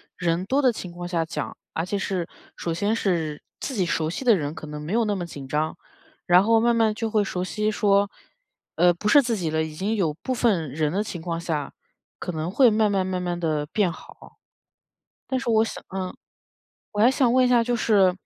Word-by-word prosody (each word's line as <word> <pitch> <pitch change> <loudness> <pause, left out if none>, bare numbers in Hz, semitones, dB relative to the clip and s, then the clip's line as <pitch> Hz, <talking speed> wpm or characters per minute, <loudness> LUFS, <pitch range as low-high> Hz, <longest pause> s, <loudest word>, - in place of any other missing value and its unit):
人 175 +1 -1
多 270 +7 +2
的 255 -3 +4
情 190 -5 -7
况 175 0 -8
下 170 -2 -1
讲， 160 - -5 0.2
而 160 - -1
且 200 +2 -2
是 185 -3 -2 0.3
首 170 - -3
先 205 +6 0
是 165 -8 -1 0.2
自 270 - -4
己 190 -4 +1
熟 160 -2 0
悉 180 - -4
的 235 -5 +5
人 150 -1 -3
可 155 - -8
能 150 0 -6
没 155 +6 -4
有 235 +1 +3
那 205 -2 0
么 175 - -3
紧 145 -5 -9
张， 150 +3 -1 0.5
然 175 +1 +6
后 225 +2 +4
慢 235 +1 +3
慢 225 -2 +3
就 225 0 -2
会 215 -1 +3
熟 180 -1 -3
悉 210 +5 -1
说 200 -1 +2 0.7
呃 175 0 +5
不 190 +5 -2
是 290 - +7
自 240 -3 -1
己 175 -6 -2
了， 160 0 0
已 160 -1 -4
经 200 +7 -1
有 170 -8 +1
部 260 - -1
分 200 - +1
人 150 +2 -1
的 200 +3 +1
情 175 -5 -6
况 165 0 -3
下， 155 -5 -3 0.5
可 180 - -4
能 160 0 -3
会 245 +6 +5
慢 215 -1 +2
慢 195 -2 +1
慢 185 -1 -2
慢 175 -1 -2
地 155 -3 -1
变 200 -5 +2
好。 - - -14 0.9
但 260 - 0
是 260 -1 -5
我 220 0 +4
想 - - -6 0.2
嗯 185 -1 -3 0.8
我 205 - -3
还 230 - +7
想 260 -2 +3
问 255 0 +5
一 - - +2
下 245 -1 +4
就 240 +1 0
是 200 -6 +4
185 Hz, 245 characters per minute, -24 LUFS, 165-220 Hz, 0.9 s, 是